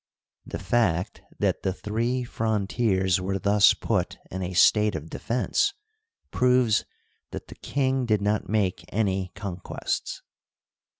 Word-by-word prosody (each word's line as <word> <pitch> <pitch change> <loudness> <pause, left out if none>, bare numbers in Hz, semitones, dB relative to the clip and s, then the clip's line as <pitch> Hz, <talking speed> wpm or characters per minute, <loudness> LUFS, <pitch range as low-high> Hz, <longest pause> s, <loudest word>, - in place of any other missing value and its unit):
The - - -4
fact 95 -7 0 0.2
that - - 0
the 95 - -1
three 115 +6 -1
frontiers 100 -4 0
were 95 +1 -1
thus 100 +1 +5
put - - -1
in 95 - -4
a 90 0 -3
state 105 +2 +5
of 80 +1 -6
defense 260 - 0 0.6
proves 125 -3 +3 0.4
that - - -8
the - - -10
king 130 -2 0
did 105 -2 +3
not 105 +1 -1
make 95 -5 0
any 95 -3 0
con 95 -2 -5
quests. 90 - -4
105 Hz, 130 wpm, -26 LUFS, 95-120 Hz, 0.6 s, thus